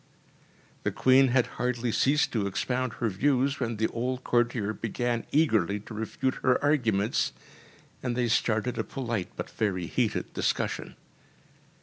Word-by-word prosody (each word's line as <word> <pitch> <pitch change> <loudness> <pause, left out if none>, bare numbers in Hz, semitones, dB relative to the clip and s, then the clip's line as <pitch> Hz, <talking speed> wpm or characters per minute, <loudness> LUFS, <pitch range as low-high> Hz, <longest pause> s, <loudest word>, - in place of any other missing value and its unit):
‚ÄĚ - - -32
The - - 0
Queen 130 +1 +5
had 125 -1 +3
hardly 125 -1 -2
ceased 145 +6 +2
to 105 -4 0
expound 125 +4 -1
her 115 - -1
views, 135 +6 +1
when 115 -3 -2
the 110 - +1
old 125 +2 -3
courtier 115 -3 +1
began 115 +2 -2
eagerly 110 - +2
to 110 - -10
refute 115 +4 -2
her 125 -1 +3
arguments, 115 -8 +1 0.7
and 125 -2 -2
they 120 -1 +2
started 115 +1 +1
a - - +1
polite 115 -8 -3
but - - -6
very 95 -5 -1
heated 110 +5 -1
discussion. - - -1
120 Hz, 145 wpm, -28 LUFS, 110-130 Hz, 0.7 s, Queen